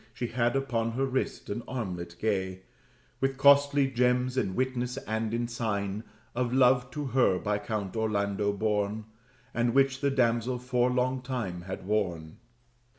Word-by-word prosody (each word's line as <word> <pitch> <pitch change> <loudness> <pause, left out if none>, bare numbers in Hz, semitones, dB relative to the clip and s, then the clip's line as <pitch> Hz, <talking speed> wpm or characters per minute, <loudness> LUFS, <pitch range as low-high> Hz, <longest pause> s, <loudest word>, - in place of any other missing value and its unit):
She 120 - -3
had 120 0 +1
upon 115 -4 0
her 135 +3 0
wrist 130 0 -2
an 110 +4 -3
armlet, 90 -9 -4
gay 95 -3 -1 0.6
With 135 0 0
costly 140 0 +5
gems, 125 0 +2
in 100 -8 0
witness 125 -1 -1
and 110 0 -2
in 120 +1 -1
sign 105 -3 -2 0.3
Of 120 0 -1
love 125 -1 +4
to 150 +1 -3
her 120 -8 +4
by 105 +2 -1
Count 105 -3 -4
Orlando 100 -2 0
borne, 105 +1 -1 0.5
And 120 +1 +1
which 135 0 +3
the 140 - +2
damsel 125 -2 +1
for 125 0 +1
long 125 +1 0
time 120 -9 -4
had 95 - -5
worn. 90 -7 -1
120 Hz, 155 wpm, -29 LUFS, 105-130 Hz, 0.6 s, costly